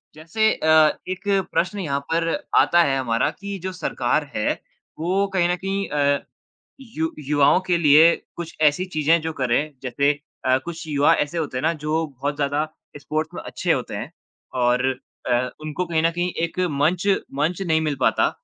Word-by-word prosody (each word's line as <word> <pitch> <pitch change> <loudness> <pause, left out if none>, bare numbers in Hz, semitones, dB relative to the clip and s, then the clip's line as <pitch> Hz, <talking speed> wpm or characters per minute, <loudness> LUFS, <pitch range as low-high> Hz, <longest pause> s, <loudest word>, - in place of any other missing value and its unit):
जैसे 220 +8 +1
अ, 155 -1 +4
एक 185 +3 -5 0.3
प्रश्न 185 +4 0
यहाँ 140 -6 -1
पर 165 0 +1 0.3
आता 175 0 +5
है 135 -3 +1
हमारा 115 -2 +1
कि 200 0 -5
जो 185 - -2
सरकार 145 -4 -1
है 105 - +1 0.5
वो 185 +5 +1
कहीं 175 -2 +2
न 180 - +2
कहीं 195 +2 -3
अ, 145 -1 +2 0.6
यु 160 -11 -3 0.2
युवाओं 145 +3 +4
के 175 - +3
लिए 160 +1 +6 0.2
कुछ 170 -1 -7
ऐसी 155 +4 +3
चीज़ें 160 -1 +2
जो 160 0 -3
करें, 140 +3 0
जैसे 140 +3 +2 0.3
अ, 130 0 +4
कुछ 170 -1 -7
युवा 145 -1 +4
ऐसे 150 +4 -2
होते 145 -5 -2
हैं - - -2
ना 165 +2 +2
जो 155 +1 -1
बहुत 140 +1 -4
ज़्यादा 145 +1 0 0.3
स्पोर्ट्स 155 +2 -3
में - - -5
अच्छे - - -2
होते - - -3
हैं - - -6 0.5
और 125 +1 +2 0.4
अ, 125 0 +1
उनको 155 +4 -3
कहीं 160 -2 0
न 165 - +3
कहीं 175 +1 -1
एक 170 - -3
मंच 170 +7 +1 0.3
मंच 165 +6 0
नहीं 160 -4 +1
मिल 150 -2 -1
पाता, - - +3
155 Hz, 180 wpm, -22 LUFS, 145-175 Hz, 0.6 s, लिए